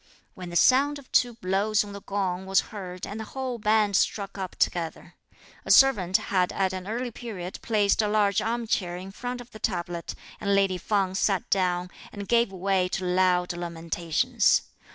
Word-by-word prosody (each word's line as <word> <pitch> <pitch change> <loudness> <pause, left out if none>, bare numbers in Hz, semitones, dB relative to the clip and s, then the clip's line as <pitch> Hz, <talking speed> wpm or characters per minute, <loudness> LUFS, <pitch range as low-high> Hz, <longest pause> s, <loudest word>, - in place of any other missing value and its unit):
when 180 -1 -8
the 175 - -7
sound 275 +9 +4
of 280 -2 -15
two 245 -2 +3
blows 205 +2 +1
on 205 -1 -9
the 200 - -8
gong 190 -2 -2
was 195 0 +4
heard 185 -3 -6
and 210 +2 -6
the - - -4
whole 255 -3 -3
band 210 -1 +2
struck 195 0 0
up 190 -2 -5
together. 165 -2 -2 0.5
A - - -9
servant 195 -10 +5
had 185 -2 0
at 190 -1 0
an 185 0 -6
early 240 +3 -3
period 195 -6 -7
placed 210 -2 +2
a 210 - 0
large 205 -2 +2
armchair 225 -6 -1
in 190 +2 -8
front 245 +4 -5
of 245 0 -14
the 215 - -11
tablet, 175 -4 -3 0.2
and 200 -1 +1
lady 195 -2 +2
Feng 195 0 0
sat 195 0 0
down, 180 -1 +1 0.2
and 200 -1 -7
gave 235 -3 +3
way 190 0 0
to 185 0 -3
loud 180 0 +2
lamentations. 170 -1 0
195 Hz, 180 wpm, -26 LUFS, 180-215 Hz, 0.5 s, servant